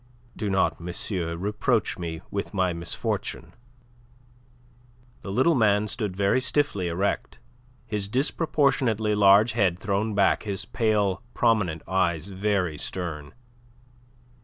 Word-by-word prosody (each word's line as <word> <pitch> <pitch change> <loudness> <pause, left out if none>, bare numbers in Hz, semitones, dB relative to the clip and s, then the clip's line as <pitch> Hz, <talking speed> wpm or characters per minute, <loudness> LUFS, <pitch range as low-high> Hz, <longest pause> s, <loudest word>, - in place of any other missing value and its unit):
"Do 105 - -3
not, 95 -1 +1
monsieur, 85 0 -3
reproach 105 +4 0
me 80 -2 -5
with 100 +1 -4
my 95 -2 +1
misfortune." 85 +1 -4 1.7
The 95 - -6
little 130 +11 +3
man 105 -5 +3
stood 105 -3 -3
very 100 +6 +2
stiffly 135 -9 0
erect, 90 +4 -2 0.5
his 105 -4 -3
disproportionately 130 -4 +1
large 105 +2 +6
head 100 -6 +1
thrown 100 +2 -1
back, 100 -1 +3
his 100 -3 -4
pale 105 -5 0
prominent 100 -9 +1
eyes 90 -1 0
very 95 -5 -1
stern. 80 -6 -5
100 Hz, 110 wpm, -26 LUFS, 90-110 Hz, 1.7 s, large